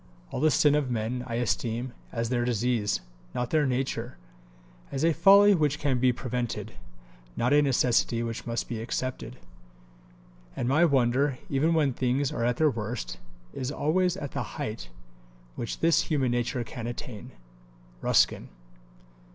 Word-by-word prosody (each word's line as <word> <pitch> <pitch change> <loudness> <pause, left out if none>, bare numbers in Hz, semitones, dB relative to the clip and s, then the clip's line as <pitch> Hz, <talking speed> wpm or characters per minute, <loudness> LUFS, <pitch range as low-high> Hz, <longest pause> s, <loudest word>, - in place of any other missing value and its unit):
All - - -3
the 155 - +5
sin 145 0 +4
of 145 -3 +1
men 120 +1 -2
I 115 - -3
esteem 120 +1 -2 0.2
as 115 -1 -2
their 120 -1 0
disease, 120 -2 0 0.3
not 125 0 -2
their 155 -3 +3
nature; 125 -2 -2 0.7
as 140 +3 0
a 165 - +4
folly 200 +4 +7
which 150 -5 +1
can 135 -4 0
be 130 0 +4
prevented, 125 -1 -4 0.6
not 125 +4 +2
a 145 - +6
necessity 125 -3 +2
which 115 0 -5
must 115 0 -2
be 115 -2 -4
accepted. 130 +2 -4 1.2
And 120 - -2
my 155 +6 +4
wonder, 135 -1 +2
even 155 +5 +2
when 145 -5 +2
things 130 +2 0
are 115 - -2
at 120 0 +1
their 155 -2 +3
worst, 110 0 -5 0.3
is 130 +1 -3
always 180 +5 +1
at 145 -7 -5
the 140 - -3 0.2
height 110 - -5 0.7
which 115 - -5
this 165 0 +4
human 135 -6 0
nature 120 +1 -1
can 115 0 -7
attain. 120 -3 -7 0.7
RUSKIN. - - +2
125 Hz, 150 wpm, -27 LUFS, 120-145 Hz, 1.2 s, folly